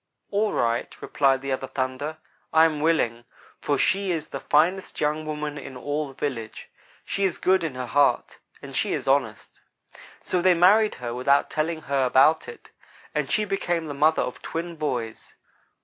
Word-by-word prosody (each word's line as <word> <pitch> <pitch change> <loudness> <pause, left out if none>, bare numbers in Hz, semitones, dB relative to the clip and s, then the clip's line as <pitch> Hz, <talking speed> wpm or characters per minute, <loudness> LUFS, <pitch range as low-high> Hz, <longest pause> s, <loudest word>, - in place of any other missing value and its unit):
"'All 210 +1 +1
right,' 115 0 -1
replied 135 -2 +1
the 135 - -3
other 130 0 -2
'thunder.' 130 +4 -3 0.4
'I 160 0 +7
am 155 -2 0
willing, 145 -7 +1 0.4
for 145 - 0
she 195 +5 +1
is 160 -3 -3
the - - -5
finest 175 +6 +1
young 155 +1 -1
woman 150 -1 -4
in 130 -2 -9
all 145 +3 -2
the 135 - -13
village. 125 -6 -5 0.3
She 200 - -2
is 190 - +1
good 190 -1 +2
in 155 -5 -3
her 130 0 -4
heart, 140 +3 +1 0.2
and - - -9
she - - 0
is - - -3
honest.' 135 -6 -1 0.6
"So 180 - -1
they 185 0 +5
married 205 +5 +5
her, 120 -1 -5
without 135 +3 +2
telling 160 +1 -1
her 140 -1 0
about 135 +5 +4
it, 470 - -12 0.4
and - - -1
she 215 - +1
became 175 -4 -1
the 150 - -5
mother 155 +3 +3
of 125 - -6
twin 170 +1 -5
boys. 120 -8 -4
150 Hz, 180 wpm, -25 LUFS, 130-170 Hz, 0.6 s, I